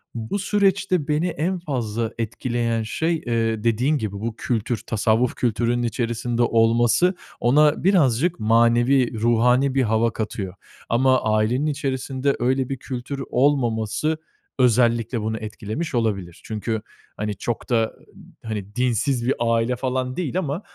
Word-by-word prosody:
bu 115 - -3
süreçte 195 -4 +1
beni 150 +4 +1
en 175 +2 -2
fazla 115 -7 -2
etkileyen 115 0 -1
şey, 160 +8 -1
ııı, 115 -2 0
dediğin 125 +6 +2
gibi 110 -5 -3
bu 110 +3 -4
kültür, 120 0 -1
tasavvuf 110 +3 +1
kültürünün 120 0 0
içerisinde 120 0 -1
olması 120 +10 +3 0.2
ona 150 +6 +3
birazcık 170 - +3
manevi, 120 +2 +3
ruhani 125 +4 +3
bir 135 - +3
hava 110 +1 +1
katıyor. 105 -4 -4 0.4
Ama 130 +2 +3
ailenin 110 +6 +1
içerisinde 135 -1 -1
öyle 130 +2 +1
bir 135 - -3
kültür 135 +2 -5
olmaması 125 +1 +1 0.4
özellikle 120 -1 +2
bunu 110 +1 -2
etkilemiş 110 +8 -5
olabilir. 100 -7 -2
Çünkü, 110 0 -3 0.4
hani, 105 -1 -2
çok 120 +1 -4
da 115 -2 +1 0.5
hani 105 -2 -5
dinsiz 125 0 0
bir 135 - +3
aile 115 +1 +1
falan 130 0 -2
değil 175 0 -2
ama 155 +1 -3
120 Hz, 130 wpm, -23 LUFS, 115-135 Hz, 0.5 s, olması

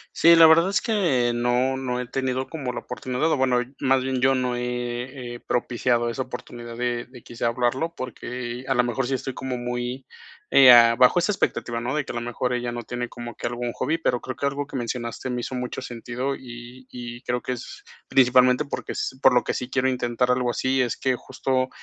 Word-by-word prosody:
Sí, 170 +1 +7
la 165 -1 +9
verdad 165 +3 +6
es 200 - +1
que 165 - +1
no 120 +2 +1
no 125 -2 -2
he 125 - -4
tenido 130 0 -2
como 140 -6 -4
la - - -4
oportunidad, 130 +5 -2
o - - +2
bueno, 130 -2 +2 0.2
más 130 0 +2
bien 130 -1 -1
yo 135 +1 +4
no 125 -1 -1
he 125 +1 -4
he - - -13
propiciado 120 0 0
esa 125 +3 -2
oportunidad 120 -2 -8
de 120 0 -1
de 125 -1 -14
quizá 120 0 -4
hablarlo, 125 +7 0
porque 125 0 -6
a 135 - +1
la 125 - +4
mejor 120 +1 -1
sí 135 - -1
estoy 130 0 -4
como 130 -1 -4
muy, 125 +1 -4 0.5
eh, 130 -2 +9
ah, 115 -1 +7
bajo 130 +7 +6
esa 180 - +1
expectativa, 120 - -1
¿no?, 120 +3 -2
de 150 -2 0
que - - -10
a - - -6
lo - - -1
mejor 120 +1 -2
ella 120 -1 -2
no 120 0 -5
tiene 120 +1 -4
como 120 -1 -8
que - - -4
algún 120 0 -3
hobby, 155 +8 -1
pero 125 -7 0
creo 130 - -5
que 140 - -2
algo 140 +1 -2
que 140 - -7
mencionaste 120 +1 -4
me 125 -1 -2
hizo 130 - -5
mucho 125 0 -4
sentido 125 +2 -4
y 125 0 -11
y 120 0 -8
creo 125 -1 -2
que 125 - -4
es 125 - -8 0.2
principalmente 125 +1 +4
porque 140 - -5
es 130 - -3
por 130 - +7
lo 125 - +3
que - - -1
sí 125 - -4
quiero 130 0 +1
intentar 125 -1 0
algo 125 -1 +1
así, 130 +2 +1
es 120 - -1
que 130 -1 0
justo, 130 +1 -1
125 Hz, 225 wpm, -24 LUFS, 120-130 Hz, 0.5 s, la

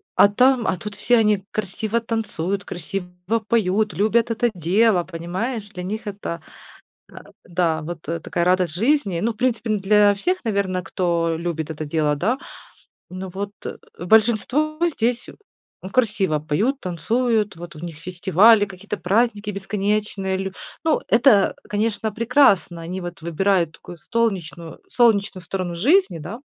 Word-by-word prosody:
а - - +7
там, 250 +3 +3
а 185 - 0
тут 210 +3 -7
все 240 +4 +2
они 210 -3 +2
красиво 215 +3 -2
танцуют, 200 -4 -3
красиво 180 +4 -4
поют, 215 -1 +1
любят 220 +3 +2
это 235 +1 +1
дело. 185 +3 +2
Понимаешь, 185 +7 -4
для 180 -3 -7
них 215 +5 -4
это 195 -5 -5 0.8
а, - - -16 0.2
да, 170 -2 0
вот 165 +1 -6
такая 170 +3 -2
радость 180 -3 +2
жизни. 215 - +1
Ну, 225 +5 0
в - - -26
принципе, 240 -2 0
н 210 - 0
для 205 +1 +4
всех, 360 - -1
наверно, 200 -5 -1
кто 170 -3 0
любит 165 -2 -3
это 155 0 -5
дело, 150 -1 +1
да. 220 - 0 0.7
Ну, 185 +1 -6
вот 200 +1 -4 0.5
большинство 235 - +2 0.2
здесь 240 0 -1 0.6
красиво 205 -10 +1
поют, 200 - 0
танцуют. 210 +4 0
Вот 170 0 -10
у - - -10
них 170 -1 -7
фестивали, 190 +5 +4
какие-то 205 +2 -7
праздники 210 +2 +1
бесконечные 200 0 -2
лю 195 0 -3 0.3
Ну, 320 -1 +2
это, 230 -4 +4
конечно, 215 +1 -1
прекрасно. 225 -7 +3
Они 175 +3 -5
вот 175 -1 -7
выбирают 170 +1 +1
такую 175 - -12
столнечную 175 -5 -3
солнечную 200 -6 +2
сторону 180 0 -4
жизни, 250 - +3
да. 175 +10 -7
200 Hz, 145 wpm, -22 LUFS, 175-225 Hz, 0.8 s, а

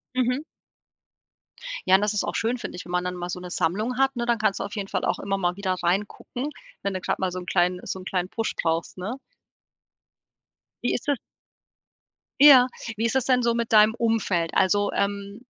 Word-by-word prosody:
Mhm. 255 +2 +1 1.5
Ja 185 - +7
und 190 - +4
das 210 0 +1
ist 210 - 0
auch - - -3
schön, 235 +3 0
finde 230 - -6
ich, 180 - -8
wenn 175 - -9
man 180 0 +1
dann 180 0 -3
mal 175 0 -5
so 180 - -4
'ne 180 - -8
Sammlung 215 +11 -1
hat, 270 0 +2
ne? 240 -1 -2
Dann 235 -1 +2
kannst 210 -2 +1
du - - -2
auf 200 - -6
jeden 200 -2 -3
Fall 190 -2 -2
auch - - 0
immer 195 0 -1
mal 180 -2 0
wieder 195 -2 -1
reingucken, 205 +9 -2 0.3
wenn 200 0 -1
du 185 - -4
grad - - -2
mal 185 -1 0
so 185 - -4
'n 180 - -9
kleinen 180 0 +1
so 190 - -4
'n 185 - -11
kleinen 180 -1 -1
Push 225 +1 -3
brauchst, 165 +2 -1
ne? 220 +9 -5 1.6
Wie 245 - +1
ist 245 - -3
da 290 - +4 1.3
ja, 270 -4 +9 0.3
wie 220 +2 -1
ist 230 +3 0
das 265 - +2
denn 255 -2 +3
so 235 0 +3
mit 235 -1 -2
deinem 215 0 +7
Umfeld? 220 -8 0
Also, 205 +2 +3
ähm, 200 +2 -2
200 Hz, 215 wpm, -25 LUFS, 185-235 Hz, 1.6 s, ja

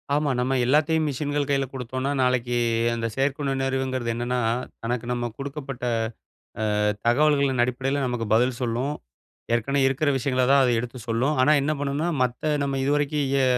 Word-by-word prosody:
ஆமா. 150 0 +1
நம்ம 130 +2 0
எல்லாத்தையும் 155 +4 +2
மிஷின்கள் 145 +1 -2
கையில 135 -1 +2
குடுத்தோன்னா, 130 +2 -3
நாளைக்கு 125 -1 +1 0.4
அந்த 115 0 -2
செயற்கை 140 +2 0
நுண்ணறிவுங்கிறது 135 -2 -1
என்னன்னா, 120 +1 -1 0.4
தனக்கு 120 0 -2
நம்ம 120 -1 -1
குடுக்கப்பட்ட 135 -2 -6 1.0
அ - - +1 0.3
தகவல்களின் 140 -1 +3
அடிப்படையில 135 +3 -1
நமக்கு 120 -2 -2
பதில் 125 +2 +2
சொல்லும். 125 +5 -1 0.6
ஏற்கனவே 135 +4 +1
இருக்கிற 135 +3 +1
விஷயங்கள 130 0 0
தான் 140 -1 +6
அது 125 - +2
எடுத்து 125 +2 -5
சொல்லும். 125 +7 +1
ஆனா, 150 +3 +5
என்ன 150 - 0
பண்ணுனா 145 +4 -1
மத்த 125 +5 -1
நம்ம 135 -1 -1
இது 140 - +1
வரைக்கும் 145 0 0 0.2
எ - - +4
135 Hz, 155 wpm, -24 LUFS, 125-140 Hz, 1.0 s, தான்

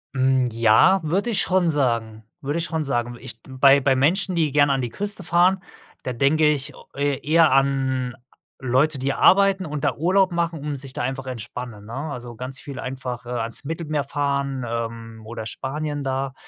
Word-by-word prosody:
Hm, 130 -1 +2
ja, 115 - +5
würde 195 +9 0
ich 195 - +2
schon 185 -2 +2
sagen, 115 -7 -1 0.2
würde 145 +4 -2
ich 165 - -1
schon 160 -2 -2
sagen. 120 -3 -2
Ich 120 -3 -9
bei 135 +1 +5
bei 135 -1 +2
Menschen, 180 +8 +1
die 160 -4 +1
gern 145 0 +4
an 135 -1 +1
die 120 - -3
Küste 200 - -4
fahren, 180 +2 +3 0.4
da 125 - -3
denke 145 +6 +3
ich 150 -1 -1
o - - -15
e 140 -1 0
eher 160 -1 +5
an 130 -2 +1 0.4
Leute, 135 +3 +1
die 135 +1 -1
arbeiten 195 0 +4
und 150 -2 -5
da 145 - +1
Urlaub 185 +4 +2
machen, 170 -1 -1
um 145 0 -4
sich 135 -1 -9
da - - -4
einfach 130 +1 -3
entspannen, 120 -3 -7
ne? 115 - -9
Also, 125 -4 -6
ganz 130 +3 -6
viel 140 -3 -8
einfach 125 -1 -5
ans 115 -2 -3
Mittelmeer 155 -1 -2
fahren, 140 -2 -2
ähm, 115 -1 -5
oder 110 0 -7
Spanien 145 +4 -3
da, 135 0 -2
135 Hz, 185 wpm, -23 LUFS, 125-155 Hz, 0.4 s, ja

